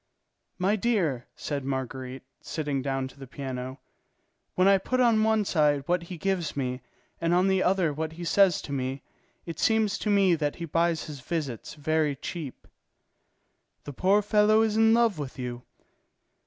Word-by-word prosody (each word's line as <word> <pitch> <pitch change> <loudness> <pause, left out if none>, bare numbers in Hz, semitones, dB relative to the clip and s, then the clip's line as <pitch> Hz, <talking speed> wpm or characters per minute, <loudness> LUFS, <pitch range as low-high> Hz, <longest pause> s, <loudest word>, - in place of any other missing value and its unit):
"My 190 +3 +2
dear," 185 - 0
said 145 -2 -4
Marguerite, 130 -1 -4 0.2
sitting 145 -4 -3
down 135 0 -2
to 140 - -18
the 135 - -9
piano, 130 0 -6 0.8
"when 185 +1 +4
I 195 -1 +6
put 255 +7 -1
on 230 -3 +4
one 220 -1 +2
side 150 -5 +2
what 175 +2 +1
he 170 +1 -8
gives 175 -4 -2
me 125 -1 -2 0.4
and 170 +1 +2
on 180 +2 +3
the 190 -1 +2
other 180 -5 +2
what 160 +2 -4
he 170 +2 -8
says 185 0 +3
to - - -8
me, 135 0 -3 0.4
it 165 -2 -7
seems 220 -3 +2
to 210 - -2
me 200 -3 +4
that 150 -3 -1
he 170 - -5
buys 165 0 +1
his 150 -3 -8
visits 140 -5 -4
very 150 -1 0
cheap." 145 0 -7 1.2
"The 145 - -7
poor 195 +8 +3
fellow 215 +1 +4
is 215 -1 0
in 225 0 +5
love 230 -8 +2
with 140 -2 -6
you." 125 -1 -5
165 Hz, 170 wpm, -27 LUFS, 140-195 Hz, 1.2 s, I